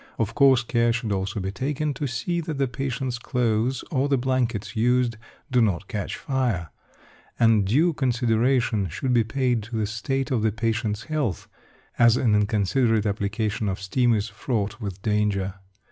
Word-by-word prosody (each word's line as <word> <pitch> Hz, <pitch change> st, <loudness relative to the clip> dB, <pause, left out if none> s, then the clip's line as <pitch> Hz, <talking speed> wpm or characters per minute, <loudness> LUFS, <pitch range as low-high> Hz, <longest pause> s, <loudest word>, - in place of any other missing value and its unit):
Of 115 Hz, -1 st, -1 dB
course, 135 Hz, -3 st, +5 dB
care 120 Hz, 0 st, +2 dB
should 115 Hz, -2 st, -2 dB
also 100 Hz, +1 st, -2 dB
be 95 Hz, 0 st, -3 dB
taken 145 Hz, +6 st, -2 dB
to 145 Hz, -, -3 dB
see 170 Hz, +8 st, -2 dB
that 160 Hz, -3 st, -4 dB
the 135 Hz, -1 st, +1 dB
patient's 130 Hz, -1 st, -3 dB
clothes 120 Hz, 0 st, 0 dB
or 140 Hz, -1 st, +1 dB
the 140 Hz, -, +3 dB
blankets 125 Hz, -4 st, -1 dB
used 120 Hz, +1 st, +2 dB, 0.4 s
do 125 Hz, -1 st, +4 dB
not 100 Hz, -3 st, 0 dB
catch 105 Hz, -2 st, -4 dB
fire; 120 Hz, -, -1 dB, 0.7 s
and 115 Hz, -3 st, +4 dB
due 155 Hz, -, +3 dB
consideration 120 Hz, -, +1 dB
should 125 Hz, -, -2 dB
be 120 Hz, -2 st, +4 dB
paid 125 Hz, 0 st, 0 dB
to 115 Hz, +3 st, -7 dB
the 110 Hz, -1 st, 0 dB
state 135 Hz, +5 st, -2 dB
of 120 Hz, -4 st, +1 dB
the 110 Hz, 0 st, +2 dB
patient's 110 Hz, 0 st, -1 dB
health, 145 Hz, -, -2 dB, 0.5 s
as 120 Hz, 0 st, +6 dB
an 115 Hz, -4 st, +2 dB
inconsiderate 105 Hz, +2 st, +2 dB
application 105 Hz, +1 st, -1 dB
of 95 Hz, -, -3 dB
steam 120 Hz, +5 st, +2 dB
is 105 Hz, +1 st, -1 dB
fraught 110 Hz, 0 st, -3 dB
with 100 Hz, -2 st, -6 dB
danger. 105 Hz, -3 st, 0 dB
115 Hz, 165 wpm, -24 LUFS, 105-130 Hz, 0.7 s, as